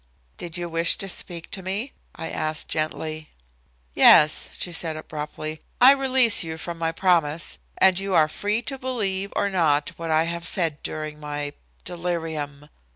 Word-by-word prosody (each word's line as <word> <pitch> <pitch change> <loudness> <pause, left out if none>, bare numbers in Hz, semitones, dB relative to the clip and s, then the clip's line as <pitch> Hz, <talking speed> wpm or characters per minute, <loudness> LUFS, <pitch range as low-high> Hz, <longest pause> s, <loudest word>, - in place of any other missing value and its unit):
"Did 170 0 -3
you 175 0 -3
wish 165 0 +3
to 195 - -3
speak 175 -2 -5
to 190 - -3
me?" 200 +8 -3 0.2
I 160 - -5
asked 155 0 0
gently. 155 0 -3 0.6
"Yes," 150 - +6
she 175 - -3
said 165 -1 -2
abruptly, 155 0 -6 0.2
"I 255 +2 +9
release 265 -4 +4
you 160 -1 -6
from 170 0 -6
your 165 0 +1
promise, 165 -3 +1 0.2
and 190 -1 +5
you 195 -1 -1
are 155 -2 +5
free 205 +8 -1
to 270 -2 -4
believe 200 -7 -2
or - - +1
not 150 -5 +2
what 165 -1 -5
I 160 0 +3
have 170 0 -4
said 165 -7 -1
during 155 -1 -5
my 145 -1 -5 0.3
delirium." 160 -4 -4
165 Hz, 160 wpm, -24 LUFS, 155-190 Hz, 0.6 s, I